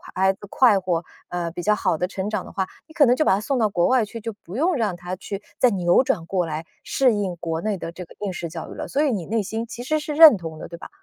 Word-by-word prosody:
孩 190 +1 +3
子 - - -23
快 235 -7 +5
活， 180 -3 -1 0.3
呃， 175 -1 -2
比 175 - -6
较 210 +3 +3
好 165 - 0
的 180 - -1
成 190 +1 -4
长 210 -4 -2
的 - - -11
话， 190 -1 -2 0.2
你 315 - -16
可 295 - +5
能 245 - +5
就 310 - +1
把 - - +5
她 200 - -2
送 270 +4 -1
到 220 - +3
国 175 -3 +2
外 255 -3 +3
去， 225 +2 -8
就 225 0 -4
不 180 - -9
用 330 +7 +2
让 215 -8 0
她 175 +1 -6
去 195 +2 -6 0.2
再 250 - +5
扭 180 +3 +3
转 170 -9 -1
过 180 -2 0
来， 155 0 -4 0.2
适 260 -3 +2
应 195 -4 -2
国 165 -1 -3
内 210 -2 -1
的 165 - -5
这 180 +1 -8
个 - - -17
应 200 - -2
试 170 -1 -4
教 165 0 -7
育 - - -8
了。 - - -5
所 290 - +1
以 290 - +2
你 190 -7 -2
内 225 +4 0
心 220 +4 -4
其 235 - -8
实 310 +4 0
是 300 0 -4
认 310 -8 +9
同 160 -2 -8
的， - - -7
对 170 - -9
吧？ - - -10
195 Hz, 325 characters per minute, -23 LUFS, 175-235 Hz, 0.3 s, 认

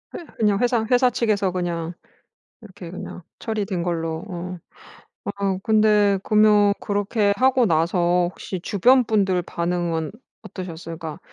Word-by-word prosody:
회 340 - -7
그냥 210 -3 +2
회사 240 -2 +1
회사 250 0 +4
측에서 215 -6 0
그냥 175 -2 -3 0.7
이렇게 190 -5 -11
그냥 180 0 -8 0.2
처리된 205 -5 -3
걸로. 165 -1 -3
어. 180 0 -6 0.8
아 195 -2 -1
근데 210 -2 +3
그러면 210 -1 +4
그렇게 205 0 0
하고 255 0 +3
나서 175 +1 +2
혹시 185 -1 -6
주변 245 +8 +4
분들 195 -5 +1
반응은 170 -2 -2 0.3
어떠셨어요? 170 -5 -7
그러니까 160 -3 -7
195 Hz, 285 characters per minute, -22 LUFS, 175-215 Hz, 0.8 s, 회사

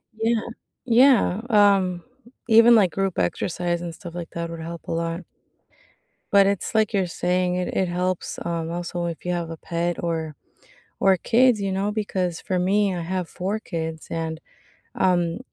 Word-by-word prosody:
Yeah. 225 0 +1 0.4
Yeah, 240 -5 +4
um, 195 -4 +3 0.5
even, 230 +2 +7
like, 195 -6 +4
group 195 -2 -2
exercise 175 0 -1
and 170 -2 -6
stuff 175 -4 -10
like 175 -1 -7
that 170 0 -4
would 165 -1 -7
help 165 +1 -7
a - - -4
lot. 165 +1 -2 1.1
But 200 -1 +6
it's 200 +3 -1
like 220 0 +2
you're 190 -2 +2 0.2
saying, 180 0 +2
it 180 - -2
it 190 - +2
helps, 180 +1 -2
um, 165 -1 -3
also 175 0 -3
if 170 -2 -5
you 180 - -2
have 170 -1 -3
a 165 - -7
pet 170 0 -1
or 160 -3 -2 0.6
or 190 -1 +5
kids, 240 +1 +3
you 195 -1 -1
know, 195 +2 -1
because 190 -5 -2
for 185 -3 -2
me, 195 +1 +2
I 175 - -3
have 180 0 -3
4 200 +4 -3
kids, 160 -4 -5
and, 160 -1 -3 0.6
um, 175 0 +1
180 Hz, 170 wpm, -23 LUFS, 170-200 Hz, 1.1 s, even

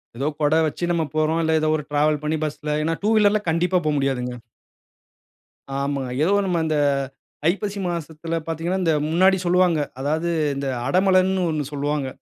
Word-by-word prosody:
ஏதோ 135 +5 -2
கொட 150 +1 +3
வச்சு 155 - -5
நம்ம 170 -2 +1
போறோம். 155 +1 +1
இல்ல 160 - +1
ஏதோ 155 - +1
ஒரு 150 - -3
டிராவல் 150 0 +2
பண்ணி 155 +1 0
பஸ்ல 150 0 -3
ஏன்னா 165 +1 0
டூ 210 - +2
வீலர்ல 210 0 +4
கண்டிப்பா 180 +3 +2
போ - - +2
முடியாதுங்க. 125 -3 -1 1.4
ஆமாங்க. 140 -1 -2
ஏதோ 185 +5 +3
நம்ம 180 -3 0
இந்த 155 -1 0 0.7
ஐப்பசி 200 +2 -2
மாசத்தில 165 -1 -4
பார்த்தீங்கன்னா, 165 +3 -2
இந்த 165 -2 +2 0.2
முன்னாடி 185 +4 +4
சொல்வாங்க. 175 -2 +3 0.2
அதாவது 155 +5 -1 0.3
இந்த 140 0 -3 0.2
அடமழன்னு 185 +3 +3
1 155 -2 -1
சொல்வாங்க. 145 -1 -1
160 Hz, 155 wpm, -22 LUFS, 150-180 Hz, 1.4 s, வீலர்ல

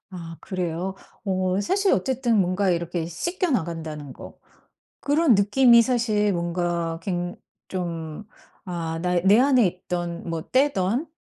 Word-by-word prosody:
아 165 -3 -8
그래요. 180 0 -3 0.3
어 185 0 0
사실 385 - +1
어쨌든 240 +2 +1
뭔가 185 +2 +1
이렇게 170 -1 -2
씻겨 345 - -2
나간다는 160 - -3
거. - - -12 0.6
그런 290 -2 +3
느낌이 235 +4 +6
사실 225 -4 +1
뭔가 170 -1 -2
굉 175 -1 -3 0.3
좀 170 -1 -5 0.4
아 165 -2 -3
나 180 0 +1
내 200 +3 +6
안에 255 -4 +4
있던 175 -1 -4
뭐 165 -1 -3
때든 260 - +1
185 Hz, 230 characters per minute, -24 LUFS, 170-235 Hz, 0.6 s, 느낌이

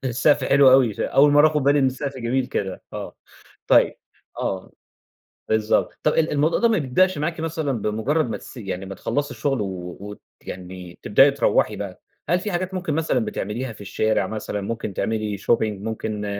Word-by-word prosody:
السقف 130 +4 +2
حلو 140 -2 +6
أوي، 130 -5 +4
ش - - -8
أول 145 +1 +4
مرَّة 145 +2 +7
آخُد 150 -2 -1
بالي 145 +1 +4
إن 135 - +3
السقف 135 +1 -3
جميل 125 +1 -1
كده، 95 -2 -4
آه، - - -6 0.5
طيب - - +4 0.4
آه، 95 -1 -3 0.8
بالضبط. 110 0 +1
طَب 150 - +3
ال 160 0 +1
الموضوع 150 +3 +2
ده 235 - +4
ما 225 - +2
بيبدأش 185 +6 +2
معاكِ 160 +2 -2
مثلًا 160 -3 -2
بمجرّد 120 +8 0
ما 105 - -3
تس - - -13
يعني 95 -4 -5
ما 95 0 -7
تخلّصي 145 -1 -2
الشغل 135 -6 -1
و 95 +1 -6 0.3
ويعني 90 -1 -9
تبدئي 135 +7 +5
تروّحي 140 -3 +1
بقى، - - -7 0.3
هل 175 +1 +3
في 205 +3 -4
حاجات 185 +1 -2
ممكن 175 -5 -2
مثلًا 160 -4 +1
بتعمليها 115 +4 -4
في 105 - -14
الشارع، 105 -1 0
مثلًا 105 -1 -4
ممكن 110 -1 -4
تعملي 110 -1 -2
shopping 115 +4 +2
ممكن 105 0 -4
125 Hz, 180 wpm, -23 LUFS, 105-150 Hz, 0.8 s, مرَّة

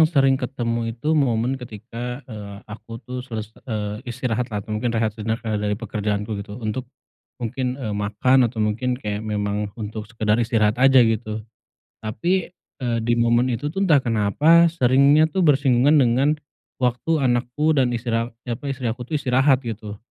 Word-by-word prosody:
yang 160 - +6
sering 135 -4 +3
ketemu 115 -3 -2
itu 150 +6 -1
momen 130 -3 +1
ketika, 120 +3 -7
eee, 105 -4 -8
aku 115 +1 -9
tuh 125 +2 -5
seles 110 -4 -6 0.2
eee, 105 -2 -3
istirahat 125 0 -2
lah 105 -3 -4
atau 110 - -6
mungkin 110 +3 -1
rehat 110 -2 +1
sejenak, 110 +2 -3
eee, 110 -2 -1
dari 105 0 -1
pekerjaanku 105 -1 -3
gitu, 105 +1 -8
untuk 120 +2 -4 0.5
mungkin, 125 +2 -3
eee, 120 -6 -4
makan 105 +5 +2
atau 110 -2 -2
mungkin 120 +4 -1
kayak 105 -4 -4
memang 105 -1 -2
untuk 110 -1 -6
sekedar 110 0 +1
istirahat 110 -1 +1
aja 135 -2 +7
gitu. 110 -1 -2 0.6
Tapi, 175 - -1
eee, 120 -9 -4
di 120 +1 +1
momen 120 +1 +3
itu 130 +5 -2
tuh 195 - -3
entah 180 -6 +5
kenapa 135 +10 +4
seringnya 140 0 +4
tuh 185 +4 -1
bersinggungan 140 -2 +4
dengan 130 0 +3 0.5
waktu 130 +5 0
anakku 125 +5 +1
dan 130 -5 +2
istri 115 0 -4
a 115 +1 0 0.2
apa, 120 +2 -5
istri 125 -4 -2
aku 125 +1 -9
tuh 155 - 0
istirahat 135 0 +2
gitu. 110 -2 -6
120 Hz, 170 wpm, -22 LUFS, 110-130 Hz, 0.6 s, aja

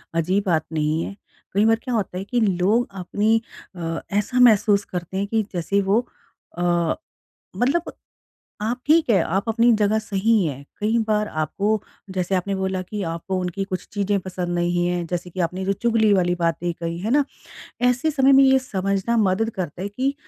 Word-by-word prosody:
अजीब 185 +5 +1
बात 160 -4 +1
नहीं 155 +1 0
है। 195 - -6 0.4
कई 200 +3 +3
बार 225 0 +5
क्या 255 - -3
होता 200 -4 -2
है 190 - -3
कि 240 +5 -1
लोग 205 +4 +2
अपनी 215 +5 +1 0.3
अ, 165 -2 -3
ऐसा 210 +5 0
महसूस 210 -4 +5
करते 180 +1 -5
हैं 200 +1 -1
कि 225 +2 +1
जैसे 180 +3 0
वो 200 +3 +2 0.6
अ, 175 -2 +1 0.6
मतलब 290 +8 0 0.7
आप 235 +4 -1
ठीक 315 -2 +4
है, 205 -5 +5
आप 195 +6 -1
अपनी 230 +2 +4
जगह 210 +1 +2
सही 215 0 +1
हैं। 140 -3 -4 0.2
कई 220 +3 +1
बार 210 -1 +1
आपको 200 +6 -1 0.3
जैसे 185 +1 0
आपने 195 +2 -1
बोला 190 -1 -1
कि 205 +3 -5
आपको 170 +3 -3
उनकी 180 +2 -2
कुछ 185 -2 -5
चीज़ें 200 -1 0
पसंद 180 -1 -5
नहीं 175 0 +1
है, 175 0 -1
जैसे 175 +1 -4
कि 180 - -8
आपने 180 +2 -1
जो 195 - +1
चुगली 220 +1 +2
वाली 180 -2 +2
बातें 170 0 -1
कही 170 0 -5
है 205 +5 -3
ना? 290 +2 +4 0.6
ऐसे 250 +5 +2
समय 275 -2 +4
में 270 0 +7
ये 265 0 +5
समझना 200 -2 -1
मदद 215 +1 +2
करता 180 -1 -4
है 200 - -2
कि 260 +7 -1
195 Hz, 185 wpm, -22 LUFS, 175-220 Hz, 0.7 s, में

